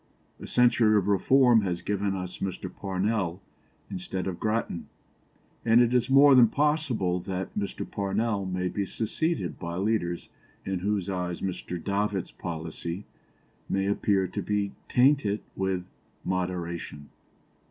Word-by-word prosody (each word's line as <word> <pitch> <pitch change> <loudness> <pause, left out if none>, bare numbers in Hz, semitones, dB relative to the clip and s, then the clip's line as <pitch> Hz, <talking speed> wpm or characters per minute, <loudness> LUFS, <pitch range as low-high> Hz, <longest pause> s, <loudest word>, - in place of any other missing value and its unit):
A - - -8
century 115 -3 +4
of 100 -1 +1
reform 120 +4 +5
has 90 -4 -2
given 100 -1 -1
us 90 -1 -5
Mr. 95 -1 -4
Parnell 95 -2 -1 0.5
instead 90 0 -4
of 90 -2 -4
Grattan, 110 -5 -1 0.8
and 115 0 +5
it 120 0 +4
is 125 0 +2
more 140 +1 +7
than 125 -3 +8
possible 135 - +1
that 95 +1 -4
Mr. 100 -1 -3
Parnell 100 0 -1
may 90 0 -1
be 100 +3 -2
succeeded 150 - -2
by 85 -1 -4
leaders 95 -3 -1 0.4
in 95 -1 -1
whose 100 0 -1
eyes 90 -2 -3
Mr. 90 -1 -3
Davitt's 100 +1 -1
policy 85 +3 -5 0.6
may 95 0 +1
appear 100 -1 +2
to 90 - -4
be 105 -1 -1 0.2
tainted 125 -6 +3
with 95 -2 -1 0.4
moderation. 85 -5 -3
100 Hz, 130 wpm, -27 LUFS, 90-110 Hz, 0.8 s, than